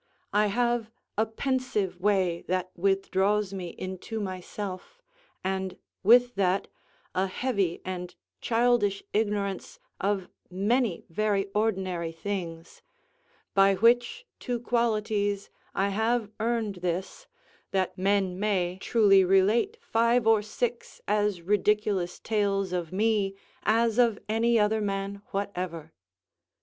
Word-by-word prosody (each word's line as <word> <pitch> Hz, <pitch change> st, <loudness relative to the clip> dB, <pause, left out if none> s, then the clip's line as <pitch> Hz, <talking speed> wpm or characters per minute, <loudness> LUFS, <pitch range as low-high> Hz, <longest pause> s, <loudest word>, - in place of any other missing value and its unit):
I 210 Hz, +1 st, +4 dB
have 235 Hz, +1 st, 0 dB, 0.3 s
a 220 Hz, +2 st, +1 dB
pensive 220 Hz, -6 st, -1 dB
way 185 Hz, -3 st, +1 dB
that 185 Hz, 0 st, -1 dB
withdraws 195 Hz, +2 st, +1 dB
me 185 Hz, -2 st, -4 dB
into 190 Hz, +4 st, -5 dB
myself, 190 Hz, -, -6 dB, 0.4 s
and, 190 Hz, -1 st, -2 dB, 0.2 s
with 245 Hz, +4 st, +6 dB
that, 195 Hz, 0 st, +1 dB, 0.5 s
a 190 Hz, +1 st, +1 dB
heavy 195 Hz, -4 st, -1 dB
and 180 Hz, -1 st, -5 dB, 0.2 s
childish 230 Hz, -4 st, +2 dB
ignorance 205 Hz, -, -1 dB, 0.2 s
of 195 Hz, -2 st, 0 dB, 0.2 s
many 205 Hz, +2 st, 0 dB
very 200 Hz, +1 st, 0 dB
ordinary 185 Hz, -6 st, 0 dB
things, 165 Hz, -1 st, -5 dB, 0.7 s
by 195 Hz, 0 st, +5 dB
which 240 Hz, -, +3 dB
two 245 Hz, -2 st, -2 dB
qualities 215 Hz, -4 st, 0 dB, 0.2 s
I 195 Hz, +1 st, +1 dB
have 220 Hz, +1 st, 0 dB
earned 225 Hz, -3 st, -1 dB
this, 180 Hz, -, -3 dB, 0.4 s
that 190 Hz, -2 st, 0 dB
men 190 Hz, -1 st, +1 dB
may 190 Hz, -3 st, 0 dB
truly 200 Hz, -4 st, +5 dB
relate 205 Hz, -, +3 dB
five 235 Hz, -, +2 dB
or 220 Hz, -1 st, +5 dB
six 235 Hz, +3 st, -4 dB
as 205 Hz, -4 st, +1 dB
ridiculous 205 Hz, -2 st, +1 dB
tales 200 Hz, -3 st, 0 dB
of 175 Hz, -3 st, -2 dB
me 205 Hz, -1 st, +1 dB, 0.3 s
as 230 Hz, +1 st, +2 dB
of 230 Hz, -4 st, +4 dB
any 230 Hz, +2 st, +2 dB
other 215 Hz, +1 st, +2 dB
man 200 Hz, 0 st, -3 dB
whatever. 180 Hz, -5 st, -4 dB
200 Hz, 115 wpm, -28 LUFS, 185-225 Hz, 0.7 s, with